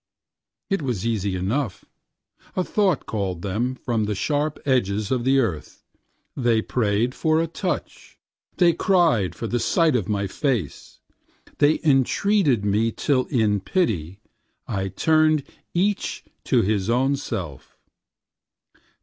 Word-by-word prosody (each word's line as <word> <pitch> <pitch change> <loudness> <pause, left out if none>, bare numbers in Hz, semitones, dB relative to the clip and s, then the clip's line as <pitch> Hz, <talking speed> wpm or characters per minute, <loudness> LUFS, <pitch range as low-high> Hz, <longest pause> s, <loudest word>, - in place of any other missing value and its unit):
It 195 - +1
was 120 -8 -2
easy 100 -4 -1
enough– 100 +4 -2 0.7
a 185 - +1
thought 190 -6 +1
called 95 -5 -3
them 115 +6 -1
from 115 -4 -1
the 105 0 -2
sharp 145 +7 -1
edges 105 -6 0
of 125 -2 0
the 135 +1 +4
earth; 100 - -2 0.5
they 120 -4 +1
prayed 115 +1 0
for 160 +2 +1
a 165 - +1
touch, 175 +3 -5 0.4
they 175 -2 +5
cried 165 - +2
for - - -5
the 120 +2 -1
sight 165 +2 +2
of 110 -6 -1
my 100 -1 0
face, 110 - -3 0.6
they 145 +2 +4
entreated 140 - +2
me 105 +3 +1
till 130 +2 0
in 110 -6 +1
pity 95 - -1 0.5
I 95 -1 -2
turned 155 - +2 0.3
each 195 +3 -1 0.2
to - - +3
his 100 0 0
own 130 +4 +2
self. 95 - -6
120 Hz, 130 wpm, -23 LUFS, 100-150 Hz, 0.7 s, they